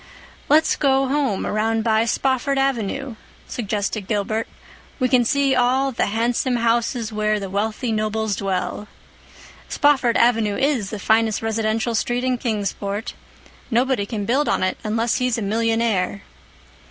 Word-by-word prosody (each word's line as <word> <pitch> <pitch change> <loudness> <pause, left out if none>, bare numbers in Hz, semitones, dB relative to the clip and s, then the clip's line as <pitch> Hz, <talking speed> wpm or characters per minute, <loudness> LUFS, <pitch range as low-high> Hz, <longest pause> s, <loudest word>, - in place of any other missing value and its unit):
"Let's 310 +2 +4
go 270 -1 +2
home 275 -8 0
around 220 +1 0
by 220 0 +2
Spofford 270 +3 0
Avenue," 270 -1 -1 0.3
suggested 205 -2 -3
Gilbert. 215 +1 -1 0.5
"We 255 - +1
can 250 -1 +4
see 275 +2 +2
all 260 +2 +2
'the 235 - 0
handsome 235 +4 0
houses 230 -1 0
where 215 0 0
the 195 -2 -6
wealthy 220 +4 -1
nobles 215 -1 -1
dwell.' 195 +2 -3 0.8
Spofford 270 -5 +3
Avenue 225 -4 +2
is 265 -8 0
the 215 - -5
finest 220 +2 +1
residential 225 +1 -1
street 240 +2 -1
in 255 -1 0
Kingsport. 205 -2 -3 0.6
Nobody 240 -3 +1
can 210 -2 -3
build 270 +7 +1
on - - +1
it 185 - -1
unless 225 +1 0
he's 250 -2 0
a 225 - -3
millionaire." 220 - 0
225 Hz, 140 wpm, -21 LUFS, 215-255 Hz, 0.8 s, Let's